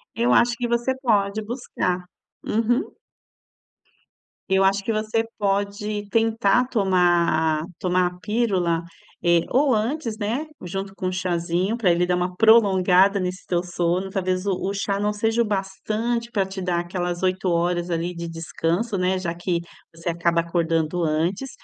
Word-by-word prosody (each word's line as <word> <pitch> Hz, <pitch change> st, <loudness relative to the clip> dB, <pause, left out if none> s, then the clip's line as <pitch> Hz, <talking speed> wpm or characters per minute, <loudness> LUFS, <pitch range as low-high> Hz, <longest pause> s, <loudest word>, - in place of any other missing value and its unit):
Eu 235 Hz, +2 st, +2 dB
acho 240 Hz, 0 st, +4 dB
que 240 Hz, -1 st, -2 dB
você 240 Hz, +2 st, 0 dB
pode 210 Hz, -4 st, +1 dB
buscar. 205 Hz, -6 st, -2 dB, 0.4 s
Uhum. 240 Hz, -, 0 dB, 1.5 s
Eu 190 Hz, 0 st, +3 dB
acho 195 Hz, +1 st, +2 dB
que 225 Hz, -, 0 dB
você 220 Hz, +1 st, 0 dB
pode 205 Hz, +1 st, -1 dB
tentar 225 Hz, +1 st, +2 dB
tomar 175 Hz, -7 st, +2 dB
a, -, -, -6 dB
tomar 180 Hz, 0 st, +1 dB
a 180 Hz, -, -13 dB
pílula, 190 Hz, -7 st, 0 dB, 0.4 s
eh, 170 Hz, -1 st, +5 dB
ou 270 Hz, -1 st, +3 dB
antes, 230 Hz, +1 st, -2 dB
né, 235 Hz, +9 st, -2 dB, 0.2 s
junto 195 Hz, +2 st, -5 dB
com 195 Hz, -1 st, -4 dB
um 185 Hz, -, -1 dB
chazinho 180 Hz, +3 st, -1 dB
para 200 Hz, -7 st, +3 dB
ele 175 Hz, +1 st, +3 dB
dar 180 Hz, 0 st, +1 dB
uma 180 Hz, 0 st, -2 dB
prolongada 200 Hz, -3 st, +5 dB
nesse 185 Hz, 0 st, -4 dB
teu 175 Hz, -1 st, 0 dB
sono. 175 Hz, +2 st, -1 dB
Talvez 185 Hz, -1 st, -1 dB
o 200 Hz, -, +2 dB, 0.2 s
o 200 Hz, -, -2 dB
chá 200 Hz, 0 st, -1 dB
não 210 Hz, 0 st, 0 dB
seja 225 Hz, +2 st, 0 dB
o 235 Hz, -, +3 dB
bastante 215 Hz, +4 st, -2 dB
para 200 Hz, -4 st, +1 dB
te 190 Hz, 0 st, -7 dB
dar 180 Hz, -1 st, 0 dB
aquelas 175 Hz, 0 st, -3 dB
8 185 Hz, 0 st, 0 dB
horas 175 Hz, 0 st, 0 dB
ali 170 Hz, +1 st, -2 dB
de 170 Hz, 0 st, -5 dB
descanso, 165 Hz, +5 st, -2 dB
né, 185 Hz, +1 st, +1 dB
já 170 Hz, -2 st, -3 dB
que 175 Hz, 0 st, -1 dB, 0.3 s
você 165 Hz, +1 st, -3 dB
acaba 170 Hz, 0 st, +1 dB
acordando 165 Hz, 0 st, 0 dB
antes. 170 Hz, +11 st, -1 dB
190 Hz, 160 wpm, -23 LUFS, 175-215 Hz, 1.5 s, eh